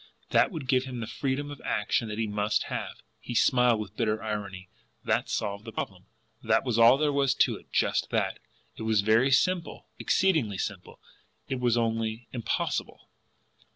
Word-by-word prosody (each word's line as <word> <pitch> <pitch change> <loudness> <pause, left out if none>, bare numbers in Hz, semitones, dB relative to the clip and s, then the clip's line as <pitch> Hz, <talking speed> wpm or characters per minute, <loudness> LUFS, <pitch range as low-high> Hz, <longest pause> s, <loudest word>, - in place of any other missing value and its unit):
That - - +4
would 155 -7 -6
give 130 0 +2
him 130 -2 -6
the 115 - -3
freedom 140 +4 -3
of 145 - -9
action 105 +2 0
that 105 0 -5
he 115 - 0
must 105 0 0
have. - - -5 0.2
He 120 - -7
smiled 125 -2 +4
with 105 - -7
bitter 110 -2 -1
irony. 100 -4 -5 0.4
That - - 0
solved 100 +1 -2
the 115 - -8
problem! - - -6 0.3
That - - +2
was 120 -3 0
all 115 +3 +7
there 150 0 +1
was 140 -1 +2
to - - +3
it - - -19
just - - +1
that! - - -1 0.4
It - - -8
was 110 -2 +2
very 110 +6 +3
simple, 175 +6 0
exceedingly 155 - +1
simple; 95 -2 -5 0.5
it 130 - -2
was 120 -1 +2
only 115 0 -1
impossible! 120 -3 -3
115 Hz, 175 wpm, -28 LUFS, 110-130 Hz, 0.5 s, all